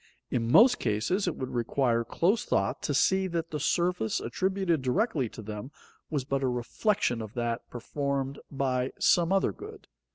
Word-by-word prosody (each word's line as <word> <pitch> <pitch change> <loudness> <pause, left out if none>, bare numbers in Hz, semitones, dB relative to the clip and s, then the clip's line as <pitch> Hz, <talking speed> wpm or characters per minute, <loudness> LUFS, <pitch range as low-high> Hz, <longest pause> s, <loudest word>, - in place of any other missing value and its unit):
In 115 -1 0
most 245 - +7
cases 145 - 0
it 175 - -1
would 130 - -5
require 120 0 +1
close 185 - +1
thought 100 0 0
to 145 - -1
see 190 +6 +3
that 165 -2 -3
the 150 - -3
service 170 -5 0
attributed 185 +3 0
directly 130 - 0
to 110 - -10
them 105 +4 -6 0.4
was 145 -5 -2
but 135 0 -1
a 135 - +1
reflection 125 - 0
of 110 -1 -8
that 120 -1 -2
performed 140 +2 -3
by 130 -2 -1
some 175 0 +3
other 195 0 +2
good. 425 0 -11
135 Hz, 165 wpm, -28 LUFS, 120-180 Hz, 0.4 s, most